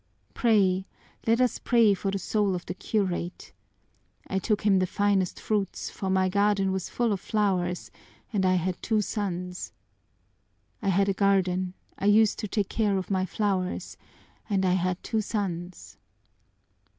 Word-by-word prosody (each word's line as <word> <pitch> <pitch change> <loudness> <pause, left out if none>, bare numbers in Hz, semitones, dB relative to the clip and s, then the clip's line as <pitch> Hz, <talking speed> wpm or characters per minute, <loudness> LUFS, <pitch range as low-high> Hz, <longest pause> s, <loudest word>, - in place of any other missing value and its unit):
Pray, 195 -5 +2 0.4
let 230 +1 +4
us 250 -1 +2
pray 230 -4 +4
for 195 +1 -2
the 195 - -1
soul 200 0 0
of 175 - -6
the - - -4
curate! 185 -3 -2 0.7
I 190 - -1
took 210 +2 0
him 200 -2 +4
the 185 - +1
finest 200 -1 +1
fruits, 205 -3 -2
for 190 - -4
my 190 0 +3
garden 200 0 +2
was 190 -1 -3
full 235 -3 0
of 195 - -2
flowers 185 -4 -1 0.4
and 200 -2 +1
I 185 0 +3
had 180 0 -1
two 220 -2 +1
sons! 180 -4 -4 1.1
I 200 - 0
had 195 +1 +3
a 195 - +2
garden, 185 -2 +1 0.2
I - - -2
used 210 +1 +4
to 210 - -3
take 205 -1 -1
care 210 -3 +1
of 190 +1 -4
my 190 -1 +1
flowers, 190 -2 -2 0.5
and 195 -2 +1
I 180 - +3
had 185 0 -1
two 220 -2 0
sons!" 175 - -4
195 Hz, 160 wpm, -27 LUFS, 185-210 Hz, 1.1 s, let